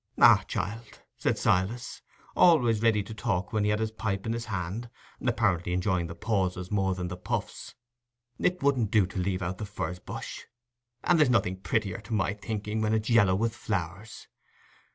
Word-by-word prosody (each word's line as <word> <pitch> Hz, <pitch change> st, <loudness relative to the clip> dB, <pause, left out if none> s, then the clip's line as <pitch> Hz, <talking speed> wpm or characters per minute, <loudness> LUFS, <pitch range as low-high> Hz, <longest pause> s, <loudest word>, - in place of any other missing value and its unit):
"Ah, -, -, +7 dB
child," 115 Hz, +2 st, -4 dB, 0.2 s
said -, -, +1 dB
Silas, 105 Hz, +7 st, 0 dB, 0.3 s
always 125 Hz, -11 st, +5 dB
ready 110 Hz, -3 st, +3 dB
to 110 Hz, -, -8 dB
talk 100 Hz, -3 st, -2 dB
when 110 Hz, -1 st, +1 dB
he 105 Hz, -, +2 dB
had 105 Hz, 0 st, +1 dB
his 110 Hz, -1 st, -1 dB
pipe 100 Hz, -3 st, -3 dB
in 115 Hz, -, -1 dB
his 115 Hz, 0 st, -4 dB
hand, 100 Hz, +3 st, -4 dB, 0.3 s
apparently 100 Hz, -8 st, +1 dB
enjoying 90 Hz, -2 st, 0 dB
the 85 Hz, -, -8 dB
pauses 95 Hz, -4 st, -1 dB
more 95 Hz, -2 st, +1 dB
than 90 Hz, -1 st, -3 dB
the 90 Hz, -, -5 dB
puffs, 90 Hz, -, -4 dB, 0.6 s
"it 180 Hz, -3 st, 0 dB
wouldn't 130 Hz, -7 st, +2 dB
do 105 Hz, -2 st, +4 dB
to 95 Hz, +1 st, -5 dB
leave 95 Hz, +1 st, -1 dB
out 90 Hz, +1 st, -3 dB
the -, -, -4 dB
furze 90 Hz, -3 st, -4 dB
bush; -, -, -7 dB, 0.6 s
and 175 Hz, -2 st, +3 dB
there's 150 Hz, -4 st, +5 dB
nothing 95 Hz, -6 st, +2 dB
prettier, 100 Hz, +3 st, -1 dB
to 110 Hz, +2 st, -4 dB
my 100 Hz, -1 st, +1 dB
thinking, 105 Hz, 0 st, -3 dB
when 110 Hz, 0 st, +2 dB
it's 110 Hz, +2 st, -1 dB
yallow 105 Hz, -5 st, +5 dB
with 115 Hz, +3 st, 0 dB
flowers. 100 Hz, +1 st, -4 dB
105 Hz, 180 wpm, -28 LUFS, 95-115 Hz, 0.6 s, Ah